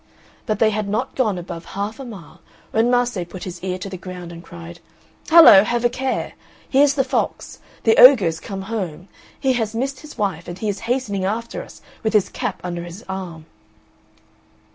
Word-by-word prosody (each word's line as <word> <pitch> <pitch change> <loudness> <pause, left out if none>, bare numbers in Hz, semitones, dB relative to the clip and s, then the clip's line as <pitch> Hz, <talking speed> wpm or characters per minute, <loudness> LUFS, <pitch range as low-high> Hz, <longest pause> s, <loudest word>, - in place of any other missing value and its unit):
But 215 -3 0
they 215 0 +3
had 210 -1 -2
not 220 +6 -2
gone 215 -8 0
above 170 -1 -7
half 205 +5 -3
a - - -6
mile 195 -10 -11 0.3
when 225 +2 +2
Mase 245 -4 +1
put 185 - -8
his 180 -1 -8
ear 185 -1 -2
to 185 - -7
the 190 -1 -6
ground 180 -1 -8
and 170 0 -10
cried: 85 - -11 0.5
"Hallo, 320 - +9
have 240 +2 -1
a - - +5
care; 260 +1 -2 0.3
here's 280 +1 +4
the 270 - +2
fox. 260 +1 -3 0.2
The 225 - +4
ogre 250 -6 +9
is 165 -1 -1
come 195 -1 -6
home. 190 -5 -5 0.3
He 265 -2 +2
has 225 -3 -2
missed 265 +3 -2
his 300 -3 -12
wife 190 -6 -2
and 175 - -6
he 215 +2 -2
is 200 - -3
hastening 225 -7 -1
after 230 - -3
us - - -14 0.2
with 220 -2 -1
his 210 -3 +3
cap - - -4
under 175 -1 -4
his 175 +6 -10
arm." 180 -4 -6
210 Hz, 195 wpm, -21 LUFS, 180-245 Hz, 0.5 s, Hallo